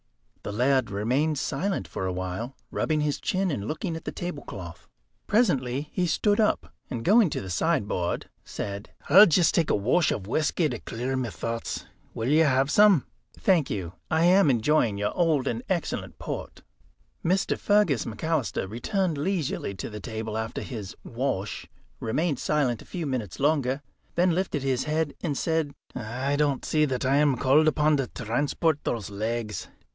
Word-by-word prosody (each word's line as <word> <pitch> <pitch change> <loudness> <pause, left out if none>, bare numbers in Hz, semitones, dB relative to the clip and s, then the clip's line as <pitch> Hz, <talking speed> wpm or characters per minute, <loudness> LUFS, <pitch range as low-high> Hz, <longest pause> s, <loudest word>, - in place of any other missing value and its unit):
The - - -5
laird 125 +2 +2
remained 130 +10 0
silent 195 +7 -2
for 95 - -3
a - - -1
while, 95 +8 -4 0.2
rubbing 155 -1 0
his 150 -1 -1
chin, 190 -1 0
and 105 -7 -3
looking 165 - -3
at 160 - -8
the - - -3
tablecloth. 100 - -7 0.4
Presently 145 - +1
he 180 -1 +1
stood 205 +6 +2
up, 215 - +1 0.2
and 120 -3 -4
going 210 0 +6
to - - -3
the 95 - -6
sideboard, 105 - 0 0.2
said: 100 0 -5 0.2
"I'll 200 +8 +9
just 170 0 +4
take 165 -3 +2
a - - +3
wash 125 - +2
of 95 - -3
whisky 155 - +1
to 120 -4 -4
clear 125 +3 -3
my 130 -3 -1
thoughts. 115 +2 -4 0.3
Will 115 +3 -1
you 155 +2 +5
have 135 0 +2
some?" 205 -8 +6 0.3
"Thank 175 -7 +2
you; 90 -4 -4 0.2
I 160 +1 +2
am 185 -1 +6
enjoying 120 -3 +2
your 105 +1 -1
old 160 -6 +2
and 115 -1 -1
excellent 180 -4 -2
port." - - -6 0.6
Mr. 185 +3 +1
Fergus 205 - +2
McAlister 145 -4 -1
returned 160 - -1
leisurely 160 - -1
to - - -5
the 105 - -6
table 110 0 -5
after 110 0 -3
his 105 -7 -6
"wash," 115 -5 -3 0.3
remained 145 +5 0
silent 140 -6 +1
a - - -13
few 175 -3 -4
minutes 125 - -3
longer, 140 -1 +1 0.3
then 180 +1 +3
lifted 170 -6 -1
his 130 -2 0
head 155 -1 0
and 150 -6 -2
said: 160 -4 0 0.2
"I 130 +4 -2
don't 145 -2 +1
see 155 -1 +3
that 130 -2 -2
I 135 +2 +3
am 145 -3 +3
called 145 +6 +4
upon 155 0 +3
to 135 -2 -1
transport 140 +7 0
those 105 -4 -3
legs." 110 +1 -3
140 Hz, 170 wpm, -26 LUFS, 115-160 Hz, 0.6 s, I'll